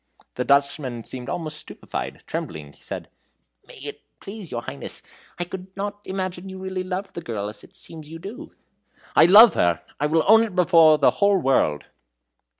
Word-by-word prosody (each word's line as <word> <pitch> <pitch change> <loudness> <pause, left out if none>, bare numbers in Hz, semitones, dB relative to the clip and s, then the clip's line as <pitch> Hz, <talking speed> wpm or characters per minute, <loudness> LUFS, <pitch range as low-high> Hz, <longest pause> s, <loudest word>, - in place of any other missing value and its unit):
The 125 - -2
Dutchman 140 -3 +1
seemed 125 +1 -7
almost 155 -3 -4
stupefied; - - -7
trembling, 75 -2 -6
he - - -22
said: - - -6 0.6
"May - - -13
it - - -7 0.2
please 200 -3 -9
your 120 0 -4
Highness, 70 - -7 0.3
I 175 - 0
could 185 +2 -9
not 205 +1 -4
imagine 185 -1 -4
you 190 - -8
really 190 0 -4
loved 185 +2 -4
the 170 - -6
girl 110 -9 -4
as 105 0 -9
it 185 - -18
seems 160 -5 -10
you 165 - -8
do." 220 - -9 0.6
"I - - +8
love 210 +5 +9
her! 85 -1 +1 0.2
I 150 - +1
will 160 +1 +2
own 220 +2 +8
it 220 -5 -2
before 165 -4 +6
the 145 - +4
whole 200 -1 +3
world!" 130 - +1
170 Hz, 180 wpm, -23 LUFS, 135-190 Hz, 0.6 s, love